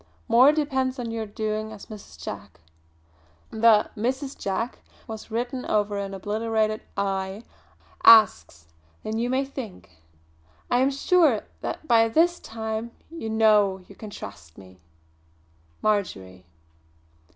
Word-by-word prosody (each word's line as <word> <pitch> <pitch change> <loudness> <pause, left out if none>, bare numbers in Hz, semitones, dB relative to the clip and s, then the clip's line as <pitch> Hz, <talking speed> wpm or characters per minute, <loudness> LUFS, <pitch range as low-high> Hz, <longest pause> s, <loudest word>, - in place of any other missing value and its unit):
More 255 +5 +7
depends 270 -4 -1
on 235 -2 -4
your 225 -1 -4
doing 215 0 -3
as 215 -2 -10
Mrs. 200 - -12
Jack" 80 +1 -8 0.9
the 220 -1 +4
"Mrs. 260 +5 -2
Jack" 200 +5 -3 0.3
was 220 -1 -8
written 245 +3 -3
over 205 -1 0
an 195 -1 -4
obliterated 215 +2 -1 0.2
"I" 195 +1 -2 0.6
"asks 85 - +6 0.4
than 220 +1 -3
you 240 +1 -1
may 265 +2 +1
think. 255 - -9 0.8
I 245 - +4
am 265 +2 +3
sure 280 - +3 0.2
that 315 - -5
by 225 -2 +5
this 340 +7 +3
time 220 0 -5 0.2
you 330 -9 -6
know 210 -4 +3
you - - -13
can 215 +2 -10
trust 80 - -10
me. 95 -1 -15 1.0
"MARJORY." 95 - -2
220 Hz, 125 wpm, -25 LUFS, 200-245 Hz, 1.0 s, More